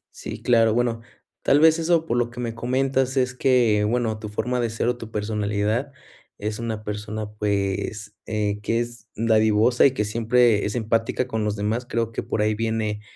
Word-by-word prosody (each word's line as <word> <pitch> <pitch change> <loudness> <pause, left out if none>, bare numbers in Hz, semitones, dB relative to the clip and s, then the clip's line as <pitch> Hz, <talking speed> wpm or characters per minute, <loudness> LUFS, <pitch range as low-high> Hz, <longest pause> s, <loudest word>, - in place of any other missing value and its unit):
Sí, - - -7
claro. 115 -2 +4
Bueno, 120 -1 0 0.4
tal 145 - +4
vez, 160 +1 +5
eso 165 0 +2
por 120 - -1
lo 120 -1 +1
que 120 +1 -11
me 115 -2 -3
comentas 130 +2 0
es 125 -1 +1
que 120 -5 +3
bueno, 110 0 0
tu 105 -1 -6
forma 125 +4 -2
de 120 - 0
ser 115 +1 -2
o 125 - +1
tu 115 -2 -9
personalidad 105 +4 -1 0.5
es 105 +1 -4
una 110 -2 -4
persona, 105 0 -5
pues, 105 +1 -2
eh, 105 -1 -1
que 115 +3 0
es 120 0 -6
dadivosa 110 +3 +4
y - - +1
que 105 - 0
siempre 115 0 +2
es 105 - -3
empática 115 +1 0
con 110 -3 -2
los 105 0 -1
demás. 110 +4 -2
Creo 115 -1 -1
que - - -3
por 105 - -1
ahí 110 0 +2
viene 110 -1 -2
115 Hz, 190 wpm, -23 LUFS, 105-120 Hz, 0.5 s, vez